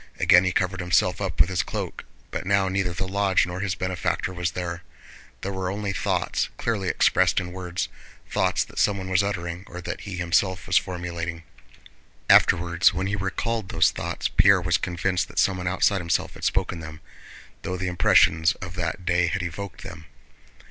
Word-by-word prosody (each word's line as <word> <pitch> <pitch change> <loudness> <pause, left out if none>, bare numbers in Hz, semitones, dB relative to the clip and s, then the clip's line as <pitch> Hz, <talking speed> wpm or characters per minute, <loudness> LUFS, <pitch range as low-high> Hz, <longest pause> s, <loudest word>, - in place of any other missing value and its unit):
Again 90 0 +6
he 90 - +1
covered 95 0 -1
himself 90 +1 +1
up 95 -4 -3
with - - +6
his 95 -1 0
cloak, - - -5 0.3
but - - -3
now 100 -1 +3
neither 95 -1 0
the 95 +2 -3
lodge 100 -1 +2
nor 90 +1 -5
his 95 -1 -1
benefactor 95 0 -2
was 90 -2 -2
there. 85 -2 -4 0.6
There 100 - -3
were 95 -1 -3
only 100 0 -3
thoughts - - -1
clearly 105 -5 -1
expressed 90 +1 +3
in 90 -1 -6
words, 90 -1 -3 0.4
thoughts - - +1
that - - -8
someone 100 -2 +1
was 95 +1 +4
uttering 90 -3 -3
or 90 - -8
that - - -5
he 100 -3 -6
himself 90 -1 +1
was - - -1
formulating. 85 -2 -5 0.9
Afterwards 85 +1 +4
when 95 - -1
he 100 +1 -1
recalled 105 +2 -2
those 80 -1 +3
thoughts - - -3
Pierre 100 -1 +5
was 90 0 +1
convinced 90 +1 -1
that - - -15
someone 90 -2 +1
outside 95 +1 +2
himself 85 -1 -1
had - - -13
spoken 85 - 0
them, 80 -1 -9 0.6
though 90 - -4
the 90 - -3
impressions 80 -2 +4
of 90 -2 -8
that 90 0 -4
day 90 -1 +2
had 90 +3 -2
evoked 90 +2 -6
them. 85 -2 -10
90 Hz, 180 wpm, -25 LUFS, 85-95 Hz, 0.9 s, Again